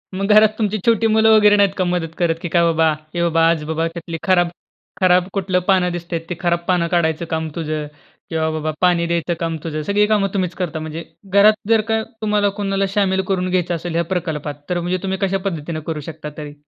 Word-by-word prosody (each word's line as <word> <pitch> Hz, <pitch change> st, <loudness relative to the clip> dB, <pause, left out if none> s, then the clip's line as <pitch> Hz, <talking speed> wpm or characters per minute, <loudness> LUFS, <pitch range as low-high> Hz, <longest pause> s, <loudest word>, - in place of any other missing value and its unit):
मग 195 Hz, +1 st, -1 dB
घरात 215 Hz, 0 st, +7 dB
तुमची 215 Hz, -1 st, 0 dB
छोटी 230 Hz, -1 st, +3 dB
मुलं 220 Hz, 0 st, +5 dB
वगैरे 210 Hz, -1 st, +6 dB
नाहीत 200 Hz, -1 st, +3 dB
का 185 Hz, -, +1 dB
मदत 175 Hz, -2 st, -2 dB
करत? 170 Hz, -2 st, +2 dB
की 175 Hz, -, -4 dB
काय 170 Hz, +1 st, +3 dB
बाबा, 160 Hz, -1 st, +3 dB, 0.3 s
ए 170 Hz, -, 0 dB
बाबा, 165 Hz, -1 st, +2 dB
आज 165 Hz, -2 st, 0 dB
बाबा, 160 Hz, +1 st, 0 dB
त्यातली 170 Hz, -1 st, -5 dB
खराब 175 Hz, -2 st, +3 dB, 0.5 s
खराब 180 Hz, -1 st, +4 dB
कुठलं 185 Hz, -1 st, +1 dB
पानं 185 Hz, -2 st, +3 dB
दिसतंय 170 Hz, -1 st, -4 dB
ते 175 Hz, -, -3 dB
खराब 170 Hz, -1 st, +2 dB
पानं 180 Hz, -2 st, +2 dB
काढायचं 165 Hz, -1 st, +1 dB
काम 160 Hz, 0 st, -2 dB
तुझं 155 Hz, -2 st, -3 dB, 0.4 s
किंवा 160 Hz, -1 st, 0 dB
बाबा 155 Hz, 0 st, -2 dB
पाणी 170 Hz, -1 st, +2 dB
द्यायचं 170 Hz, 0 st, -1 dB
काम 165 Hz, -1 st, -2 dB
तुझं. 155 Hz, -2 st, -3 dB
सगळी 205 Hz, +1 st, +3 dB
कामं 200 Hz, -2 st, +2 dB
तुम्हीच 185 Hz, -3 st, -1 dB
करता 165 Hz, -3 st, -2 dB
म्हणजे. 160 Hz, +1 st, -6 dB, 0.3 s
घरात 205 Hz, +2 st, +7 dB, 0.2 s
जर 225 Hz, -1 st, +5 dB
का 220 Hz, 0 st, +2 dB, 0.2 s
तुम्हाला 210 Hz, -1 st, +2 dB
कोणाला 195 Hz, -1 st, 0 dB
शामिल 190 Hz, -2 st, +2 dB
करून 185 Hz, -1 st, 0 dB
घ्यायचं 180 Hz, -1 st, 0 dB
असेल, 170 Hz, 0 st, -5 dB
या 170 Hz, -, +2 dB
प्रकल्पात 150 Hz, -4 st, -4 dB
तर 180 Hz, -1 st, 0 dB
म्हणजे 175 Hz, +2 st, -1 dB
तुम्ही 190 Hz, 0 st, -2 dB
कशापद्धतीने 185 Hz, -5 st, -2 dB
करू 160 Hz, -2 st, -2 dB
शकता 155 Hz, -1 st, -7 dB
तरी? 150 Hz, -1 st, -7 dB
175 Hz, 210 wpm, -19 LUFS, 165-195 Hz, 0.5 s, घरात